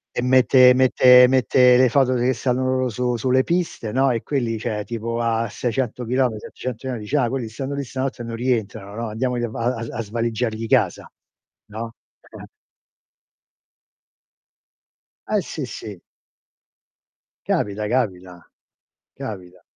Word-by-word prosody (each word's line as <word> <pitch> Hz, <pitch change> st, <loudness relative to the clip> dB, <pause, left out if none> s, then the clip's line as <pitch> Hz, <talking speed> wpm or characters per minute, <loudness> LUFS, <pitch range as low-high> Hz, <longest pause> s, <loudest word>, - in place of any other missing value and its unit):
E -, -, -1 dB
mette 130 Hz, 0 st, +6 dB
mette 125 Hz, -1 st, +6 dB
mette 125 Hz, -1 st, +4 dB
le 130 Hz, 0 st, +5 dB
foto 130 Hz, 0 st, +3 dB
che 125 Hz, +1 st, +1 dB
stanno 125 Hz, +1 st, -1 dB
loro 130 Hz, 0 st, 0 dB
su 125 Hz, +1 st, -1 dB
sulle 130 Hz, +3 st, +1 dB
piste, 170 Hz, -11 st, -2 dB
no? 135 Hz, +1 st, +2 dB
E 115 Hz, -2 st, -1 dB
quelli, 120 Hz, -6 st, -2 dB
cioè 105 Hz, -1 st, -3 dB
tipo 115 Hz, +1 st, -4 dB
a 115 Hz, 0 st, 0 dB
600 125 Hz, +2 st, -3 dB
chilometri, 125 Hz, -2 st, 0 dB
700 125 Hz, +2 st, -7 dB
metri, 120 Hz, -4 st, -4 dB
dice: 120 Hz, +8 st, -2 dB
"Ah, 125 Hz, -4 st, +1 dB
quelli 125 Hz, -2 st, -3 dB
stanno 135 Hz, +5 st, -5 dB
lì 140 Hz, 0 st, -3 dB
stanotte, 130 Hz, -1 st, -4 dB
e -, -, -7 dB
non 115 Hz, 0 st, -6 dB
rientrano, 110 Hz, -4 st, -2 dB
no, 115 Hz, -, -3 dB
andiamogli 120 Hz, +2 st, -2 dB
a -, -, -2 dB
va 115 Hz, -, -5 dB
a 115 Hz, -1 st, -5 dB
a 115 Hz, -, -4 dB
svaligiargli 115 Hz, +1 st, -3 dB
casa." -, -, +1 dB, 0.6 s
No? 115 Hz, +2 st, -6 dB, 0.4 s
Eh, -, -, -12 dB
eh. -, -, -9 dB, 2.8 s
Eh, -, -, +1 dB
sì, -, -, -6 dB
sì. 100 Hz, -5 st, -9 dB, 1.5 s
Capita, 105 Hz, +1 st, -1 dB
capita. 95 Hz, -8 st, -3 dB, 0.7 s
Capita. 90 Hz, -4 st, -8 dB
120 Hz, 145 wpm, -22 LUFS, 110-130 Hz, 2.8 s, mette